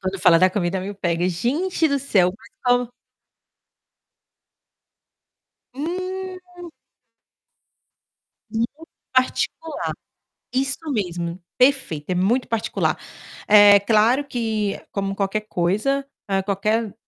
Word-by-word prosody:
Quando 190 0 -3
fala 165 -1 +7
da 185 +2 +5
comida 185 -1 -1
me 200 +2 -5
pega, 175 -2 0
gente 305 - 0
do 280 -1 +1
céu, 190 -10 +2
mas - - -18 0.2
como 245 -1 +2 2.8
Hum. 365 +2 -6 1.8
Muito 235 +9 -3 0.2
particular, 260 +5 -1 0.6
isso 270 +1 0
mesmo, 175 -6 -3 0.2
perfeito, 255 - +2
é 185 - 0
muito 215 +8 +1
particular. 225 -2 -1 0.5
É 205 -1 +8
claro 225 +7 +3
que, 220 -6 -2
como 195 -1 -2
qualquer 200 +2 -1
coisa, 215 +9 0 0.4
qualquer 210 +2 0
220 Hz, 95 wpm, -22 LUFS, 195-275 Hz, 2.8 s, É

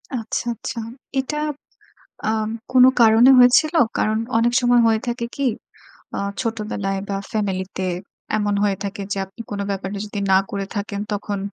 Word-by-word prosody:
আচ্ছা, 225 0 -3
আচ্ছা। 230 - -5 0.4
এটা 285 +3 -2 0.9
আম 220 0 0 0.2
কোনো 255 0 +8
কারণে 230 +3 +7
হয়েছিল? 250 +6 +6 0.2
কারণ, 215 +1 +1 0.2
অনেক 235 +1 +2
সময় 245 -1 +4
হয়ে 220 -1 +2
থাকে 235 0 -2
কি? 280 -1 0 0.7
আ - - -1 0.2
ছোটবেলায় 210 -4 -2
বা, 195 - -1
ফ্যামিলিতে 190 -3 -2 0.5
এমন 205 -1 0
হয়ে 200 -2 +1
থাকে 200 0 -4
যে 200 - -1
আপনি 195 +5 -11
কোনো 200 -1 -2
ব্যাপারে 195 0 -3
যদি 205 0 -5
না 190 - +7
করে 200 -1 -3
থাকেন 205 0 -3
তখন 205 0 -3
215 Hz, 150 wpm, -21 LUFS, 200-235 Hz, 0.9 s, কোনো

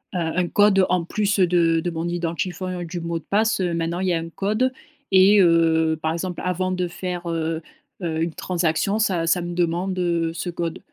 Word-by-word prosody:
un 165 -2 -1
un 180 -1 +2
code 200 0 +4
en 180 -1 +1
plus 205 +2 0
de 170 -2 +3
de 175 - -2
mon 165 0 -3
identifiant 175 +1 -3
et - - -4
du 175 +1 -5
mot 170 0 -2
de - - -19
passe. 215 +1 +1
Heu, 175 -2 0
maintenant, 170 +1 -2
il 190 - 0
y - - +2
a 165 - +1
un 165 0 -6
code 215 +9 0 0.4
et 195 +2 +6
heu, 165 -2 +3
par 160 - 0
exemple, 175 +1 -4
avant 185 +1 -1
de 180 -1 -1
faire, 175 0 -5
heu 165 -1 -2 0.4
heu, 160 -2 -1
une 165 0 -1
transaction, 180 +5 0
ça 185 -6 +1
ça 180 +1 +2
me 175 0 -5
demande, 175 +2 -1
heu, 170 -2 0
ce 170 +2 -4
code. 170 -1 -4
175 Hz, 215 wpm, -23 LUFS, 165-185 Hz, 0.4 s, et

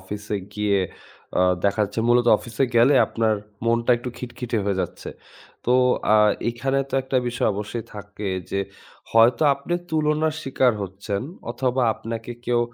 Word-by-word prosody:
অফিসে 105 +2 -5 0.2
গিয়ে 105 -1 +1 0.6
আ - - +5 0.2
দেখাচ্ছে 100 +1 0
মূলত 120 0 +4
অফিসে 120 +3 -1
গেলে 120 +5 +6
আপনার 110 -1 +1 0.3
মনটা 115 +1 +2
একটু 120 - -6
খিটখিটে 120 -2 -4
হয়ে 100 -2 0
যাচ্ছে। - - -5 0.6
তো 125 - +4 0.4
আ - - +7 0.3
এইখানে 135 +3 -1
তো - - -4
একটা 130 0 -2
বিষয় 120 - 0
অবশ্যই 105 +3 -4
থাকে 100 0 -6 0.2
যে, 100 - 0 0.5
হয়তো 115 +5 +5
আপনে 140 +5 -4 0.2
তুলনার 155 0 +1
শিকার 130 -2 +2
হচ্ছেন, 100 +2 -4 0.3
অথবা 130 +1 0
আপনাকে 115 +1 -6
কেউ 120 -1 +2
115 Hz, 140 wpm, -23 LUFS, 105-125 Hz, 0.6 s, আ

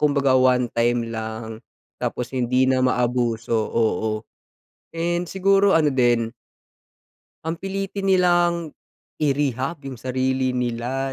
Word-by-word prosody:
kumbaga 140 -3 +3
1 130 -1 +4
time 120 0 +1
lang 110 0 -6 0.4
tapos 125 +1 -3
hindi 125 0 +2
na 130 -1 +2
maabuso, 120 -2 0
oo, 110 -1 0 0.7
and 175 +1 -1
siguro 195 0 +3
ano 150 -3 +2
din 120 -3 +2 1.1
ang 165 +1 -3
pilitin 195 0 -3
nilang 175 -3 +2 0.5
i-rehab 140 0 0
yung 130 -4 -7
sarili 130 0 0
nila, 125 +2 -2
130 Hz, 110 wpm, -22 LUFS, 120-165 Hz, 1.1 s, 1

